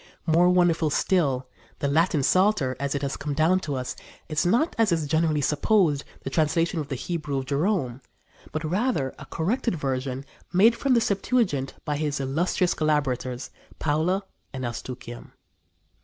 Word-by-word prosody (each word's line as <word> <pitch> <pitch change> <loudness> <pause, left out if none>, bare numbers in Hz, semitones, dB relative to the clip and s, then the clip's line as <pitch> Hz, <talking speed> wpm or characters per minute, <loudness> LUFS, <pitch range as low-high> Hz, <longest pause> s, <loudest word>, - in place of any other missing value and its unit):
More 170 +2 +4
wonderful 175 -3 +3
still, 140 -7 +1 0.3
the 140 - -1
Latin 155 0 +2
Psalter, 185 -7 +3
as 140 0 -1
it 140 - -2
has 140 - -1
come 145 -1 -3
down 165 +5 +3
to 145 -6 -4
us, 130 -1 -4 0.3
is 155 +2 +1
not, 245 - +2
as 220 -4 +4
is 160 -2 +1
generally 155 0 +1
supposed, 150 - +2 0.2
the 135 - -4
translation 165 +3 +1
from 145 - -6
the 140 - -3
Hebrew 150 0 -3
of 135 - -2
Jerome, 140 - 0 0.5
but 155 - -3
rather 175 - 0
a - - -9
corrected 200 +5 -1
version 135 -2 -3 0.3
made 215 +6 +5
from 265 +1 +2
the 235 - +4
Septuagint 195 - 0
by 150 -2 -1
his 145 -2 -1
illustrious 165 +6 +1
collaborators 135 -5 -1 0.3
Paula 160 +6 0 0.3
and 130 -2 -5
Eustochium. 120 0 -7
155 Hz, 155 wpm, -25 LUFS, 135-180 Hz, 0.5 s, made